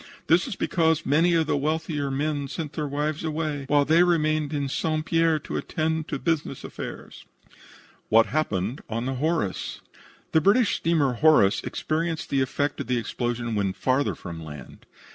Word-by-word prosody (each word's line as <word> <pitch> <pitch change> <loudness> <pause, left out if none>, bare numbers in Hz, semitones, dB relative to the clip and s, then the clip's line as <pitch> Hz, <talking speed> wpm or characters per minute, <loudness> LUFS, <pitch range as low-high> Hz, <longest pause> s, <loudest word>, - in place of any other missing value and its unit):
This 175 +7 +3
is 235 - -4
because 160 -3 +1
many 165 +5 +3
of 165 -1 +3
the - - 0
wealthier 150 0 -1
men 145 +1 -1
sent 155 +1 -5
their 150 -2 -2
wives 150 +2 -2
away, 155 -3 -2
while 145 0 +3
they 160 +4 +5
remained 155 -4 +2
in 145 -2 -1
St. 155 +3 -1
Pierre 165 -1 +3
to 150 - -5
attend 160 0 -2
to - - -3
their - - -16
business 160 -5 -1
affairs." - - -8 0.8
WHAT 115 +1 +6
HAPPENED 120 -5 -1
ON 115 +2 -2
THE 135 - -1
"HORACE" 140 - -2 0.5
The 160 - +4
British 205 +6 +3
steamer 155 -6 +1
Horace 120 -7 +4
experienced 165 +1 -2
the 135 - +2
effect 145 +2 -1
of - - -6
the 125 -1 +1
explosion 120 0 -2
when 100 -3 0
farther 130 +6 0
from 85 -2 -8
land. 75 -2 -11
150 Hz, 170 wpm, -25 LUFS, 130-160 Hz, 0.8 s, WHAT